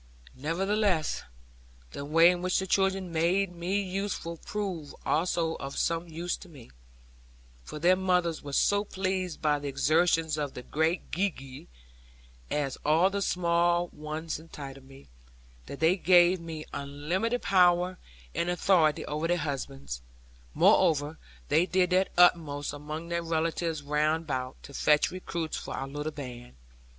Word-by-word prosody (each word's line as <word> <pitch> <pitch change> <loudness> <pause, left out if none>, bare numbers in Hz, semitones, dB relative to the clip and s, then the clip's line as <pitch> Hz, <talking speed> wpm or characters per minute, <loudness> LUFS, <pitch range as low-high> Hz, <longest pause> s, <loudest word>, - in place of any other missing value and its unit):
Nevertheless, 180 +3 0 0.7
the 140 - -6
way 165 +4 +6
in 175 -1 -3
which 185 0 +1
the 190 - 0
children 190 -1 +1
made 175 +4 +1
me 180 +4 -1
useful 190 -3 -3
proved 185 -7 -5
also 165 0 +1
of 135 0 -6
some 165 +1 0
use 170 +2 -3
to 185 - -13
me; 135 - -14 0.9
for 150 - -8
their 175 +4 +4
mothers 180 -3 +1
were 140 -1 -8
so 205 +7 +3
pleased 185 -4 -3
by 150 -1 +2
the 145 - -5
exertions 155 +3 +2
of 145 -2 -3
the 125 - -7
'great 160 +6 -1
Gee 195 +4 +1
gee' 135 -5 -11 0.8
as 140 -3 -2
all 165 +6 +4
the 200 0 -2
small 175 -1 +1
ones 155 +1 -5
entitled 135 -4 -10
me 135 0 -15 0.6
that 140 - -8
they 165 +4 +3
gave 180 0 +5
me 160 -2 -7
unlimited 165 +12 -2
power 180 -1 +3 0.3
and 170 - -1
authority 175 -4 +2
over 150 +2 -2
their 175 +1 +2
husbands; 135 - -4 0.5
moreover, 150 0 +3 0.3
they 175 +3 +3
did 185 -1 +2
their 185 +1 +3
utmost 155 -5 +3
among 155 +3 -6
their 170 0 -1
relatives 165 -1 -1
round 150 +3 +1
about, 130 -4 -3
to 140 - -11
fetch 150 +2 +3
recruits 170 -3 -4
for - - -6
our 135 - -4
little 145 +2 -4
band. 125 - -9
165 Hz, 145 wpm, -29 LUFS, 150-180 Hz, 0.9 s, way